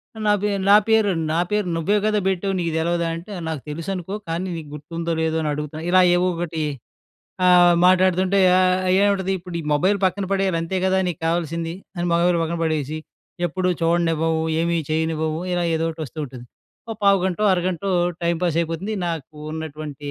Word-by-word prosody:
ఆహ్, 220 - -7
"నా 210 - +5
పే 210 - +1 0.2
నా 200 - +9
పేరు 220 -2 +4 0.2
నా 165 - +1
పేరు 210 -3 0
నువ్వే 195 +6 +1
కదా! 215 -1 +2
పెట్టావు 190 +1 -1
నీకు 170 -1 -1
తెలవదా!" 170 +1 0
అంటే, 175 +5 -9 0.2
"నాకు 155 -4 -4
తెలుసనుకో 180 +5 -4
కానీ, 170 +3 -2
నీకు 155 -3 -8
గుర్తుందో, 165 +3 -4
లేదో, 160 0 0
అని 150 - 0
అడుగుతున్నా" 150 +2 -5
ఇలా 185 0 +6
ఏవో 180 +1 +2
ఒకటి 165 -2 -3 0.8
ఆహ్, 175 -1 +6
మాట్లాడుతుంటే 185 +1 +3 0.2
ఆహ్, 185 0 +2
ఏముంటది, 195 -2 +1
"ఇప్పుడు 175 0 -9
ఈ - - -10
మొబైల్ 185 +7 +2
పక్కన 190 +1 0
పడేయాలి 195 -3 +1
అంతే 165 +3 -2
కదా! 190 0 +2
నీకావల్సింది" 165 0 -2 0.2
అని, 175 - -2
మొబైల్ 170 0 +3
పక్కన 165 +1 -2
పడేసి, 155 -2 -1 0.5
"ఎప్పుడు 180 +2 -1
చూడనివ్వవు, 165 -1 +1 0.2
ఏమీ 170 0 +1
చేయనివ్వవు" 160 0 -1
ఇలా 175 -1 0
ఏదో 160 0 0
ఒటి 160 0 -9
వస్తూ 155 +3 -10
ఉంటుంది. 125 -2 -11 0.4
ఓ - - -2
పావుగంటో, 195 0 +2
అరగంటో 185 +1 -1 0.3
టైమ్ 170 0 +1
పాస్ 170 -3 +1
అయిపోతుంది. 165 +6 -3
నాకు 160 -3 -5 0.2
ఉన్నటువంటి 155 -2 -6
170 Hz, 170 wpm, -22 LUFS, 160-185 Hz, 0.8 s, నా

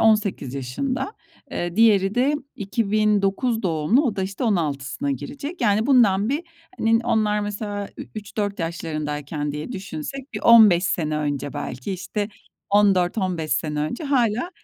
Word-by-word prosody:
18 210 - +2
yaşında. 255 - -3 0.4
Eee, 175 +1 -3
diğeri 205 -3 +4
de 270 +4 +2 0.2
2009 215 +2 +1
doğumlu. 170 - +2
O 215 - -1
da, 190 - 0
işte, 195 +6 -3
16'sına 145 - -1
girecek. 280 - -5
Yani, 210 +2 +2
bundan 220 -6 +4
bir, 295 +5 -1 0.4
hani, 225 0 +3
onlar 215 -3 +2
mesela 205 -1 -4
ü - - -6
üç 215 0 -8
4 205 -2 -1
yaşlarındayken 150 -3 -3
diye 150 +11 -5
düşünsek 195 - -6
bir - - -4
15 215 -6 +7
sene 155 -3 0
önce, 145 -1 -2
belki, 130 +9 -5
işte, 200 +3 -3 0.4
14 200 -1 +3
15 175 -5 -1
sene 150 -1 -1
önce 155 - -3
hâlâ, 250 +2 +1
200 Hz, 145 wpm, -23 LUFS, 160-225 Hz, 0.4 s, 15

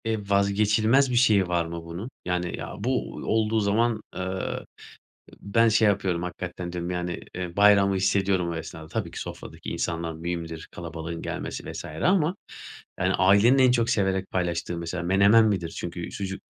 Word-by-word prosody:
Eee, 110 -1 0
vazgeçilmez 105 +6 +3
bir - - 0
şeyi 110 -6 +4
var 85 -1 0
mı 85 0 -6
bunun? 85 +8 -6 0.2
Yani, 90 -1 -2
"Ya, - - -6
bu 125 +4 -1
olduğu 110 0 0
zaman, 110 +2 +1
eee, - - -3
ı 95 0 -3 0.8
ben 115 +3 +3
şey 110 0 +4
yapıyorum, 95 -4 0
hakikaten 90 0 -5
diyorum, 90 0 -4
yani, 90 -1 -3
eee, 90 -1 -5
bayramı 100 -1 +5
hissediyorum 95 -1 +1
o - - -3
esnada." 80 -1 -7
Tabii - - -3
ki - - -7
sofradaki - - -8
insanlar 85 -1 -2
mühimdir, 80 0 -5
kalabalığın 85 0 -6
gelmesi - - -5
vs. - - -7
ama, 170 - +1 0.6
yani, - - +1
ailenin 100 +8 +5
en 130 -1 +6
çok 120 -2 +1
severek 95 -1 0
paylaştığı 85 -1 -2
mesela 85 +1 -4
menemen 100 +5 +5
midir? 95 -6 0
Çünkü 85 0 -5
sucuk 95 -1 -5
95 Hz, 165 wpm, -26 LUFS, 85-105 Hz, 0.8 s, en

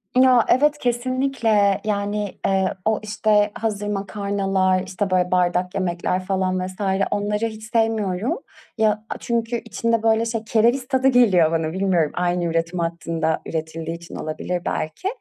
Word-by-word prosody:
Ya, 255 -2 +5
evet, 295 +4 +4
kesinlikle. 240 -5 +1
Yani, 205 -1 -2
eee, 190 -1 +1
o, 220 -1 +2
işte, 210 -1 +2
hazır 210 -2 -3
makarnalar, 195 -2 0
işte, 190 +2 -3
böyle, 180 -1 +1
bardak 180 0 +1
yemekler 185 0 -1
falan 185 -1 0
vs. 185 - -9 0.4
onları 210 +2 0
hiç 220 -1 -6
sevmiyorum. 220 -2 0 0.4
Ya, 215 -1 +1
a - - -4
çünkü 235 0 -1
içinde, 230 +1 -1
böyle, 225 0 +3
şey 225 -1 -3
kereviz 235 +4 +2
tadı 260 -1 +2
geliyor 205 -11 +5
bana 160 0 -1
bilmiyorum. 185 -5 +1
Aynı 175 0 0
üretim 165 +1 -1
hattında 165 -1 -1
üretildiği 160 0 -4
için 170 0 -11
olabilir 175 +3 -3
belki. 155 - -3
200 Hz, 140 wpm, -22 LUFS, 180-225 Hz, 0.4 s, Ya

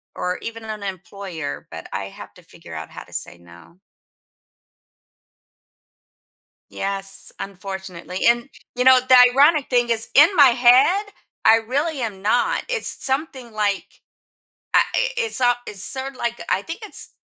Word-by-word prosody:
or 180 0 -3
even 230 0 -7
an 220 - -10
an 215 -1 -6
employer, 190 -4 -7
but - - -9
I - - -3
have - - -12
to - - -16
figure - - -14
out - - -7
how - - -10
to - - -19
say 85 - -5
no. 85 - -18 2.9
Yes, 195 0 0
unfortunately. 190 -2 -7
And, 235 +2 +3 0.3
you 250 0 -1
know, 260 0 +8
the 255 0 +5 0.2
ironic 290 +2 +4
thing 240 -2 +1
is, 225 -1 0
in 295 +3 +8
my 285 -3 +8
head, 255 - +4 0.4
I 225 - +7
really 275 +7 -2
am 210 -5 -5
not, 220 +4 +1
it's 485 -2 -2
something 265 -3 -3
like, 205 -2 -1 0.9
I - - +7
i - - +1
it's 465 -2 -1
so 245 -1 +4
it's 195 -2 -7
sorta 265 +3 -4
like, 235 -1 -3
I 190 - +1
think 330 - -8
it's 425 - -7
235 Hz, 155 wpm, -21 LUFS, 195-265 Hz, 2.9 s, know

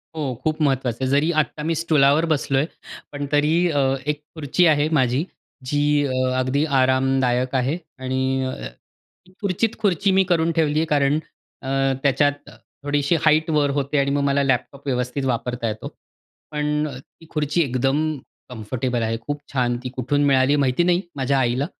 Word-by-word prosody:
हो, 145 -5 -2
खूप 155 0 -1
महत्त्वाचं 130 -4 +1
आहे. 130 - 0
जरी 145 +4 +3
आता 150 +2 -6
मी 165 +1 0
स्टूलावर 155 -1 +3
बसलो 145 -4 0
आहे, 140 +4 +1 0.4
पण 145 0 -4
तरी 150 +1 +2 0.2
अ, 145 - +1 0.3
एक 150 0 -1
खुर्ची 160 +3 +1
आहे 150 -1 +3
माझी 130 +4 +1 0.5
जी 145 - 0 0.3
अ, 135 - -2 0.3
अगदी 130 +3 +1 0.2
आरामदायक 130 -1 +1
आहे 130 +5 0 0.2
आणि 130 0 -1
अ, 130 - -5 0.6
ती 185 - -21
खुर्चीत 205 +3 -1
खुर्ची 200 -1 +1
मी 190 0 +4
करून 170 -2 +1
ठेवली 155 -2 +1
आहे 160 - +1
कारण 145 -1 +2 0.4
अ, 130 - -7 0.3
त्याच्यात 145 +1 +1 0.3
थोडीशी 145 +3 +1
हाईटवर 155 -2 +2
होते 140 +1 0
आणि 140 0 +1
मग 140 0 +1
मला 140 0 +2
लॅपटॉप 135 +1 -1
व्यवस्थित 125 +1 -2
वापरता 125 -1 -2
येतो. 110 0 -5 0.6
पण 150 0 -1
ती 165 +4 -19
खुर्ची 150 +2 0
एकदम 140 +4 0 0.3
कम्फर्टेबल 120 +1 -3
आहे. 115 0 -1
खूप 145 +3 -5
छान 125 -3 +1
ती - - -2
कुठून 145 +3 0
मिळाली 135 +1 +3
माहिती 135 +2 +2
नाही 175 0 +2 0.2
माझ्या 135 0 +1
आईला. 130 +2 +1
140 Hz, 160 wpm, -22 LUFS, 130-155 Hz, 0.6 s, मी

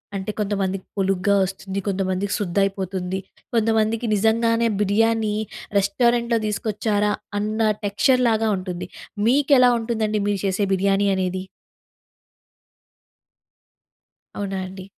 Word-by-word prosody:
అంటే, 195 +2 -3
కొంతమందికి 195 -2 -1
పొలుగ్గా 195 +1 +2
వస్తుంది, 195 +1 -5
కొంతమందికి 195 0 -1
శుద్ధ 185 -2 -3
అయిపోతుంది, 190 -1 -2 0.4
కొంతమందికి 225 +1 +1
నిజంగానే 230 +2 +2
బిర్యానీ 220 +1 +2 0.4
రెస్టారెంట్‍లో 235 +3 +2
తీసుకొచ్చారా! 210 0 0 0.3
అన్న 215 +2 -2 0.3
టెక్స్చర్‌లాగా 225 +1 +2
ఉంటుంది. 180 -1 -5 0.4
మీకెలా 265 -1 +5
ఉంటుందండి 220 -2 -1
మీరు 205 -2 0
చేసే 195 +1 +1
బిర్యానీ 195 +1 +2
అనేది? 185 0 -2 2.9
అవునా 195 -1 -3
అండి! 185 0 -9
205 Hz, 90 wpm, -22 LUFS, 195-225 Hz, 2.9 s, మీకెలా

